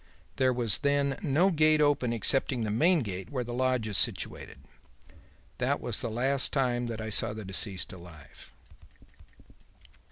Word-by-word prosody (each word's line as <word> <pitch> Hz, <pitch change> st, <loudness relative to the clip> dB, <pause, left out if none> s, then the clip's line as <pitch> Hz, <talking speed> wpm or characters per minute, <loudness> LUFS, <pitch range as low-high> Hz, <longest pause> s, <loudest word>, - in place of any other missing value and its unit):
There 130 Hz, -1 st, +2 dB
was 115 Hz, -6 st, +1 dB
then 140 Hz, -1 st, 0 dB
no 175 Hz, +3 st, +2 dB
gate 155 Hz, -1 st, +3 dB
open 145 Hz, -5 st, +1 dB
excepting 120 Hz, +1 st, +1 dB
the 105 Hz, -, -2 dB
main 165 Hz, -, +3 dB
gate 95 Hz, -3 st, -6 dB
where 130 Hz, -3 st, -3 dB
the 120 Hz, 0 st, -7 dB
lodge 130 Hz, -2 st, 0 dB
is 105 Hz, -, +2 dB
situated. -, -, -1 dB, 1.0 s
That -, -, 0 dB
was -, -, -1 dB
the -, -, -3 dB
last 130 Hz, +4 st, 0 dB
time 125 Hz, -3 st, -1 dB
that 115 Hz, -1 st, -5 dB
I 110 Hz, 0 st, -5 dB
saw 105 Hz, -, +2 dB
the 110 Hz, -1 st, -8 dB
deceased 95 Hz, 0 st, -2 dB
alive.'" 85 Hz, -6 st, -14 dB
120 Hz, 155 wpm, -28 LUFS, 110-140 Hz, 1.0 s, gate